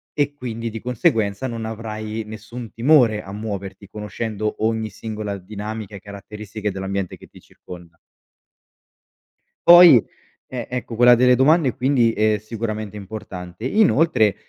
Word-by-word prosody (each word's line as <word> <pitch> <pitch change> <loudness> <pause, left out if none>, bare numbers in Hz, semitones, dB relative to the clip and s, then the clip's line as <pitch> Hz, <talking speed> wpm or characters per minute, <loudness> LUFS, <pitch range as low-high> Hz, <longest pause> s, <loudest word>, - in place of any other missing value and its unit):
e 145 -1 0
quindi, 115 -4 -5
di 115 0 -6
conseguenza, 115 -1 0
non 115 -2 -5
avrai 110 0 -5
nessun 110 +2 -9
timore 120 -4 +3
a 95 - -10
muoverti, 100 -2 -6
conoscendo 105 0 -4
ogni 110 -1 -1
singola 105 -1 -5
dinamica 105 +2 -7
e - - -8
caratteristiche 105 +1 -7
dell'ambiente 95 -1 -4
che - - -15
ti - - -17
circonda. 85 -2 -13 1.7
Poi, 175 - +9 0.4
e 125 -3 -6
ecco 125 -2 -5
quella 120 +1 +7
delle 125 +1 +5
domande, 135 0 +3
quindi, 125 -3 +2
è 110 -1 +1
sicuramente 110 -1 -5
importante. 95 -2 -8
Inoltre, 155 - +3
110 Hz, 130 wpm, -21 LUFS, 105-120 Hz, 1.7 s, Poi